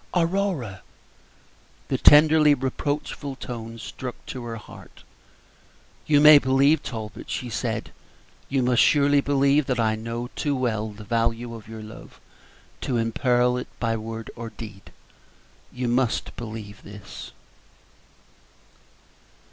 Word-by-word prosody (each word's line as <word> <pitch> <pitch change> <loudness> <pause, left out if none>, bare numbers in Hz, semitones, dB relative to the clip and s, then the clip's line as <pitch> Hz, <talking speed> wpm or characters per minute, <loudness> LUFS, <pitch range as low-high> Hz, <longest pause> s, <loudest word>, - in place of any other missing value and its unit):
"Aurora!" 170 - 0 1.1
The - - 0
tenderly 150 0 +7
reproachful 140 +1 -3
tone 115 -3 -7
struck 125 +2 -7
her - - -29
to 120 -3 -6
the 115 - -5
heart. 105 - -14 1.0
"You 145 -2 +5
may 150 0 +9
believe, 140 +3 +3
Talbot," 110 -3 -7
she 125 -2 -4
said, - - -3 0.6
"you 135 -2 +1
must 125 -1 +3
surely 145 -1 +4
believe 140 +1 +2
that 125 -3 0
I 110 -1 +2
know 115 +2 -5
too 145 -2 -1
well 110 -4 -1
the 105 0 -11
value 115 +2 -1
of 115 -2 -10
your 110 -1 -8
love 110 +1 -12 0.6
to 125 - -1
imperil 125 +2 +2
it 125 - -5
by 115 -1 0
word 115 0 -6
or 115 -1 -6
deed 105 -3 -11 0.8
you 125 0 -3
must 120 0 0
believe 110 -3 -8
this." 105 -1 -10
120 Hz, 125 wpm, -24 LUFS, 115-140 Hz, 1.1 s, may